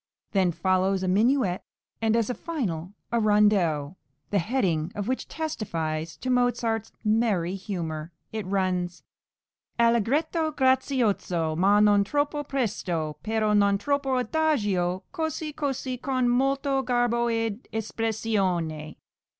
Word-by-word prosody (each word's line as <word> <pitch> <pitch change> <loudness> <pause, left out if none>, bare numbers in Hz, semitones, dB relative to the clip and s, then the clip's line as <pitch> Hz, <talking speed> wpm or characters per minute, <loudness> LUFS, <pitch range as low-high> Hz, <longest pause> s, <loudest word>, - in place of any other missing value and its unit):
Then 190 -3 +2
follows 185 +3 +1
a - - 0
minuet, 210 0 +2 0.4
and 225 0 +2
as 230 -2 +2
a 250 - -1
finale 225 - -3 0.2
a 235 - +2
"rondieaoux," 195 -8 +2 0.3
the 205 - +3
heading 175 -6 0
of 205 0 -3
which 260 +1 -2
testifies 165 - -3
to 255 - -2
Mozart's 240 -3 +1
merry 210 -5 +2
humour; 170 -5 -4 0.2
it 215 -4 -4
runs: 185 -2 -1 0.8
"Allegretto 290 - +2
grazioso, 245 - +1
ma 195 +5 +4
non 205 -1 +5
troppo 290 +6 -1
presto, 195 - -2
perö 215 -1 +1
non 200 -1 +4
troppo 270 +3 0
adagio, 205 - 0
cosi, 315 -3 -3
cosi, 270 -4 -3
con 255 -1 0
molto 270 +2 +2
garbo 240 -2 +1
ed 225 0 -2
espressione." 200 -8 -1
215 Hz, 120 wpm, -26 LUFS, 185-255 Hz, 0.8 s, non